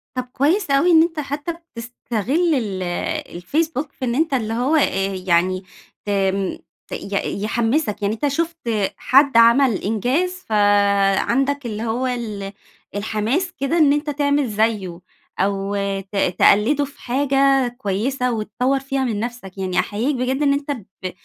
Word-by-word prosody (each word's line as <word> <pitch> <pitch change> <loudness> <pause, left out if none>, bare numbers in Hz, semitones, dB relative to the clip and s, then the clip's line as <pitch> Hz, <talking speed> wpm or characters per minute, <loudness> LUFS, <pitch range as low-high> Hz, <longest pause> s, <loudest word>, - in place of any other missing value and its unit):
طب 255 - -1
كويس 315 +5 +1
أوي 280 +6 +4
إن 320 -1 +7
أنت 330 -2 -3
حتّى 290 +3 -4
بتستغل 270 - -2
ال 200 -7 -2 0.6
الFacebook 305 - -1
في 260 - -5
إن 235 - -1
أنت 315 +1 +1
اللي 225 -4 -1
هو، 250 +7 +1
آآ 195 -9 +1
يعني 185 +2 +2 0.4
تم 195 -1 0 0.3
ت - - -27
ي 200 0 -3
يحمِّسك. 225 +1 0
يعني 205 +1 0
أنت 230 +6 -1
شُفت 330 +4 -1 0.4
حد 270 -2 +4
عمل 235 +1 +5
إنجاز 250 - 0 0.2
فعندك 205 +6 +2
اللي 220 -1 -4
هو 235 +3 -1
ال 215 -5 -4 0.4
الحماس 220 - -1
كده 275 +5 0
إن 290 -3 +5
أنت 295 +1 -1
تعمل 285 -1 +1
زيّه. 210 -5 -1 0.4
أو 195 +1 0 0.3
ت 195 +1 -13 0.2
تقلِّده 285 +8 +4
في 280 - -16
حاجة 270 0 +2
كويسة، 250 +4 -1
وتطوّر 235 +5 -1
فيها 270 0 -2
من 225 -5 -1
نفسك. 225 -5 -6
يعني 185 -1 -1
أحييك 240 +8 -1
بجد 260 +2 -1
إن 280 -1 +3
أنت 280 +1 -2
ب 195 -7 -7
245 Hz, 145 wpm, -21 LUFS, 205-285 Hz, 0.6 s, إن